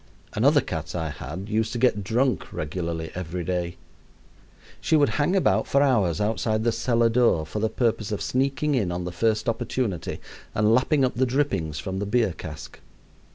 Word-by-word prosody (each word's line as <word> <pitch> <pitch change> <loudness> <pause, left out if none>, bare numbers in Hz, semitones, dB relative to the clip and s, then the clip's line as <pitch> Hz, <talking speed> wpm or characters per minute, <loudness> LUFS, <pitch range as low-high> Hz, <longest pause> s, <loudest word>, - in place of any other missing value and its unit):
Another 140 +7 +4
cat 80 -1 -5
I 80 -2 -2
had 85 +8 -7
used 110 +2 0
to - - -2
get 115 -4 +2
drunk 120 +5 0
regularly 80 +1 -4
every 90 0 -4
day. 90 0 -2 1.0
She - - +1
would 145 -2 +4
hang 150 +6 +1
about 190 - +2
for 140 +1 +3
hours 105 - +2
outside 110 +1 0
the 120 - +2
cellar 115 0 +2
door 115 -9 +3
for 90 +7 -4
the 110 +1 +1
purpose 110 -3 0
of 105 - -1
sneaking 135 +3 0
in 105 -10 +1
on 90 +1 -3
the 90 - -4
first 110 +6 0
opportunity 115 -4 -2 0.4
and 105 +1 +3
lapping 135 +3 +3
up 125 - -1
the 130 +2 +1
drippings 100 - 0
from 95 0 -4
the 100 - -2
beer 110 -3 +2
cask. 80 0 -9
110 Hz, 180 wpm, -25 LUFS, 90-125 Hz, 1.0 s, Another